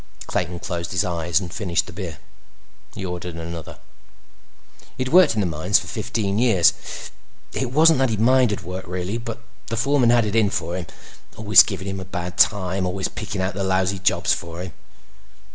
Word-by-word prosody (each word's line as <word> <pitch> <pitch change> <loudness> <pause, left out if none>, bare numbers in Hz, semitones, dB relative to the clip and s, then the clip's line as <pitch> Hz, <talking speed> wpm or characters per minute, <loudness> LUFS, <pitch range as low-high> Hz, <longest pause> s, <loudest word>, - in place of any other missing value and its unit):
Clayton 90 0 -2
closed 85 -1 -4
his 90 +3 +1
eyes 85 -2 0
and 90 -3 -7
finished 90 -6 -1
the - - -11
beer. 85 -4 -6 0.8
He 95 - -5
ordered 90 -1 -5
another. 85 -1 -7 1.2
He'd 130 0 -2
worked 175 -6 +6
in 105 - +1
the - - 0
mines 85 +4 +2
for - - -4
fifteen 100 -2 -2
years. 110 -8 +4 0.8
It 130 -2 -2
wasn't 155 +1 +5
that 135 -1 +2
he 110 - -1
minded 120 -3 +3
work 90 +1 -6
really, 90 +5 -3
but 115 0 -7 0.2
the 115 - -3
foreman 130 0 +3
had 120 -2 +4
it 105 +1 -2
in 110 -3 +4
for 85 -2 -3
him. 90 -3 -5 0.5
Always 105 -1 +8
giving 95 -3 -3
him 95 0 -4
a 95 - -7
bad 90 0 -5
time; 95 -3 +2
always 95 +1 -2
picking 105 -3 -5
out 95 +2 -1
the 100 - -3
lousy 95 0 0
jobs 95 - +2
for 85 +1 -5
him. 90 -3 -8
95 Hz, 185 wpm, -22 LUFS, 90-110 Hz, 1.2 s, Always